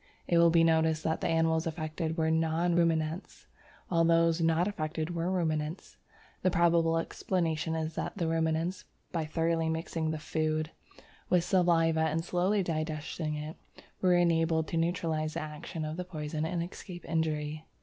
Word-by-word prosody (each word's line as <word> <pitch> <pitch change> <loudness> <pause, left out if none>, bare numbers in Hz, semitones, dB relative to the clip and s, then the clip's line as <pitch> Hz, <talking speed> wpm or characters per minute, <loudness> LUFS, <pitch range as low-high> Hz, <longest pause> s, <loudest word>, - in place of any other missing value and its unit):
It 170 - +4
will 170 0 +7
be 165 0 +4
noticed 160 -1 +3
that 160 - -1
the - - 0
animals 165 0 +2
affected 160 0 -3
were 160 -1 +2
non 165 +2 +1
ruminants, 165 0 0 0.4
while 165 -2 +2
those 165 0 +3
not 165 +2 +2
affected 160 -3 -3
were 170 +1 -1
ruminants. 160 -2 -2 0.5
The 185 - +3
probable 170 -1 +3
explanation 165 -2 -1
is 160 0 -2
that - - -4
the 170 -4 0
ruminants, 165 +2 0 0.3
by 165 -3 -1
thoroughly 165 +1 0
mixing 160 0 -2
the 160 - -2
food 155 +1 -1 0.6
with 180 -2 +3
saliva 170 -3 +3
and 160 +1 0
slowly 185 +3 +1
digesting 155 -1 -3
it, 150 +1 -6 0.4
were 180 -1 +4
enabled 165 -2 +2
to 165 - -1
neutralize 165 -2 -1
the 170 - -2
action 155 +1 -6
of 155 +2 -4
the 180 - -2
poison 155 -3 -4
and 170 0 -1
escape 175 0 -9
injury. 155 -1 -2
165 Hz, 160 wpm, -30 LUFS, 155-170 Hz, 0.6 s, will